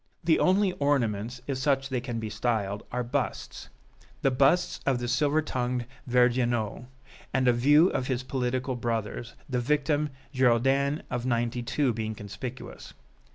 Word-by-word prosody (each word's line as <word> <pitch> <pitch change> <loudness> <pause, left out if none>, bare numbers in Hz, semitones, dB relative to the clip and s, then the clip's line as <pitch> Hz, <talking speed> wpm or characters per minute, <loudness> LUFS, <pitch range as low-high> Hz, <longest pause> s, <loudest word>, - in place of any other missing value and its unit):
The 160 -1 +3
only 190 +1 +3
ornaments, 120 -4 0
if 135 -1 -3
such 135 -1 +1
they 130 -2 -1
can 120 -2 -4
be 110 -1 -5
styled, 105 -2 -1
are 125 0 -1
busts 120 - -3 0.5
the 135 - +4
busts 140 +7 +3
of 135 -2 +2
the 120 0 -3
silver 145 +5 +2
tongued 125 -3 -2 0.2
Vergniaud 120 -2 +1 0.5
and 130 -1 +2
a 125 - +6
few 145 +8 +5
of 130 - -2
his 130 -1 -1
political 130 0 -2
brothers 115 0 -3
the 125 -2 -1
victim 150 +3 +1 0.2
Girondins 135 +3 +2
of 125 0 -2
'92 120 +2 0
being 110 0 -3
conspicuous. 120 +5 -8
125 Hz, 145 wpm, -28 LUFS, 120-140 Hz, 0.5 s, a